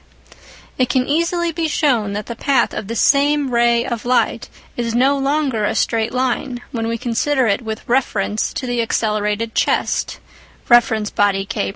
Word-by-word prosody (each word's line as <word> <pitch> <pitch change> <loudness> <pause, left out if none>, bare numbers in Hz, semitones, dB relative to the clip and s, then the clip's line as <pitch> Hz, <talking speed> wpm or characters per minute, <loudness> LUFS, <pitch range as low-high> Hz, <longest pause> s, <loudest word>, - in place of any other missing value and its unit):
It 255 -1 +2
can 255 -2 +1
easily 335 +3 0
be 325 0 -2
shown 245 -10 +1
that 210 0 -4
the 235 - -6
path 275 +2 +1
of 205 - -5
the 230 - -4
same 285 +2 +2
ray 235 0 +3
of 235 -3 -4
light 245 +1 0 0.3
is 235 -1 -2
no 265 +3 +3
longer 275 -4 0
a - - 0
straight 225 -1 0
line 255 0 -1
when 225 -2 -3
we 230 0 -2
consider 255 +3 0
it 200 -1 +1
with 220 -2 -6
reference 215 -4 0
to 260 - -4
the 245 -1 -1
accelerated 215 0 -1
chest - - 0 0.5
(reference 225 -3 +3
body 195 -1 +1
K1). - - -2
240 Hz, 170 wpm, -19 LUFS, 220-270 Hz, 0.5 s, ray